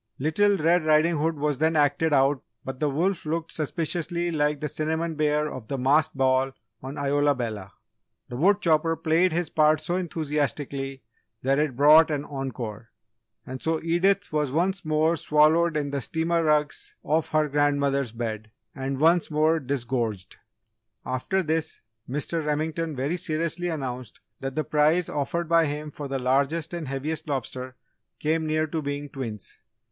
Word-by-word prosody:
Little 200 +8 +2
Red 170 +1 +3
Riding 155 +2 +3
Hood 160 +2 0
was 145 -2 -1
then 160 +1 +2
acted 150 +2 +2 0.5
but 135 -1 -6
the 150 - +1
wolf 170 +6 0
looked 165 +1 -3
suspiciously 170 +3 -2
like 150 -2 +1
the 150 - -2
cinnamon 160 +3 -2
bear 150 0 +1
of 130 -6 -7
the 135 - -3
masked 145 +3 +2
ball 130 0 +2 0.3
on 135 +2 -7
Isola 145 0 +2
Bella. 110 -6 -5 0.5
The 120 - -7
wood 195 +9 +3
chopper 165 0 +2
played 165 +3 +2
his 170 0 -1
part 155 0 +4
so 175 +4 -2
enthusiastically 145 -5 -3 0.4
that 135 +2 +2
it 150 -4 0
brought 150 +4 +7
an 150 -1 -2
encore, 120 -6 -6 0.6
and 130 0 -7
so 160 0 0
Edith 175 +3 +1
was 150 -3 0
once 185 +6 0
more 155 +1 +2
swallowed 155 +1 +3
in 145 -1 -2
the 140 -1 -2
steamer 165 +5 0
rugs 150 -1 0
of 155 +2 0
her 155 -1 +2
grandmother's 140 -3 +1
bed, 110 -2 -5 0.2
and 135 -2 -4
once 165 +3 +4
more 155 +1 +2
disgorged. 120 -7 -3 0.7
After 130 +10 -1
this, 160 0 -2 0.3
Mr. 150 +4 -2
Remington 155 +1 -2
very 140 +7 -1
seriously 165 +2 -2
announced 130 -7 -5 0.2
that 135 0 -5
the 155 - 0
prize 155 +3 +2
offered 155 +4 -2
by 165 -1 +4
him 150 +1 -4
for 145 -1 -6
the 135 0 -2
largest 140 +6 0
and 170 -4 -4
heaviest 140 +5 -3
lobster 130 -2 -4 0.4
came 160 +1 0
near 155 0 +1
to 160 +1 -3
being 145 0 -4
twins. 125 -7 -6
150 Hz, 160 wpm, -26 LUFS, 135-160 Hz, 0.7 s, brought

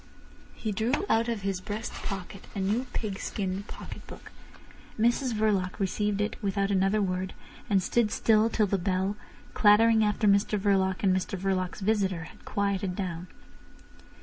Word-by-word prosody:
He 220 - -3
drew 230 - 0
out 225 +1 +3
of 225 -4 -3
his 195 -2 -2
breast 215 +4 -5
pocket 195 0 -6
a - - -2
new 210 +7 0
pigskin 195 -2 -3
pocket - - -9
book. - - -11 0.7
Mrs 240 +3 +2
Verloc 205 -4 +1
received 205 +1 0
it 210 +3 -3
without 200 -1 0
another 195 +2 +2
word, 185 0 -2 0.3
and 195 -3 +3
stood 230 +3 +2
still 220 +1 +3
till 220 -2 +2
the 195 -1 0
bell, 190 +2 0 0.4
clattering 220 +1 +5
after 210 0 +1
Mr 200 +1 +3
Verloc 190 -2 +1
and 190 -2 +4
Mr 185 +1 -2
Verloc's 185 0 -1
visitor, 195 -4 +1
had 160 - -14
quieted 200 -2 -1
down. 180 -3 -4
200 Hz, 150 wpm, -28 LUFS, 190-215 Hz, 0.7 s, clattering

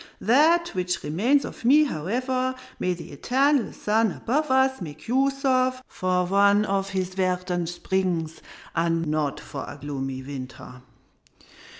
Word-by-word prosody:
That 320 - +4
which 180 -1 -2
remains 235 - +2
of - - -9
me, 285 +6 +6
however, 255 - -1 0.2
may 180 -1 0
the 170 - -10
eternal 265 - +1
sun 220 0 +1
above 295 - -1
us 265 -2 +2
make 155 -3 -8
use 275 +3 +1
of 255 -1 +2
for 180 -1 0
one 200 +2 +4
of 195 -1 -1
his 190 -2 -2
verdant 180 -2 -1
springs, 175 -3 -2 0.3
not 165 -3 0
for 140 - -7
a - - -8
gloomy 135 -2 -4
winter! 130 -2 -9
190 Hz, 130 wpm, -25 LUFS, 165-255 Hz, 0.3 s, me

